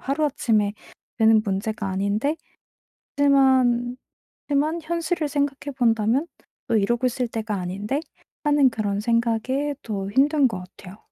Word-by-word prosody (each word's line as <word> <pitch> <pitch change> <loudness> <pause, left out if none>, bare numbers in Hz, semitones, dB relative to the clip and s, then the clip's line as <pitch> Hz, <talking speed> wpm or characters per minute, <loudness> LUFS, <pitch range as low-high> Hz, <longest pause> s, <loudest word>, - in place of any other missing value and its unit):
하루아침에 255 -8 0 0.5
되는 220 -1 +5
문제가 205 +1 -2
아닌데 200 +10 0 0.8
하지만 260 -3 +3 0.5
하지만 305 +4 +1
현실을 335 -1 -1
생각해 285 0 -2
본다면 235 +4 +2 0.4
'어 230 - +2
이러고 235 +4 +2
있을 250 0 -2
때가 220 -2 -3
아닌데.' 200 - -3 0.4
하는 290 -3 +4
그런 205 -3 -2
생각에 235 +5 0
더 200 -3 -4
힘든 280 +4 +3
것 185 -4 -6
같아요. 195 +1 -12
240 Hz, 285 characters per minute, -23 LUFS, 215-285 Hz, 0.8 s, 되는